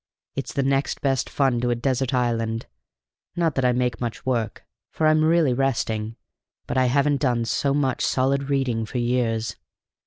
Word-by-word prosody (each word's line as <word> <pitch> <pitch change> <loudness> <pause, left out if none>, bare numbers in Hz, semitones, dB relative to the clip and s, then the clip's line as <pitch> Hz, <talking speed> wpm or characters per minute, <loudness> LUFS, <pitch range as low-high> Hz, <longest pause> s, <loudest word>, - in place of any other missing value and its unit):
It's - - -4
the 140 - 0
next 135 +1 0
best 135 -2 0
fun 130 -4 +1
to 125 - 0
a 120 - +2
desert 130 +1 0
island. 115 -3 0 0.7
Not 170 -3 +1
that 135 - -1
I 125 - +4
make 125 -1 -1
much 120 +2 -4
work, 120 -4 -2 0.3
for 160 - -1
I'm 155 0 +4
really 160 -4 +3
resting, 115 -4 -1 0.5
but - - -4
I 130 0 +3
haven't 140 +2 +2
done 120 -4 +1
so 140 +4 0
much 135 -3 0
solid 135 +2 +1
reading 125 -5 0
for 125 - -5
years. 115 -3 0
130 Hz, 175 wpm, -24 LUFS, 120-140 Hz, 0.7 s, I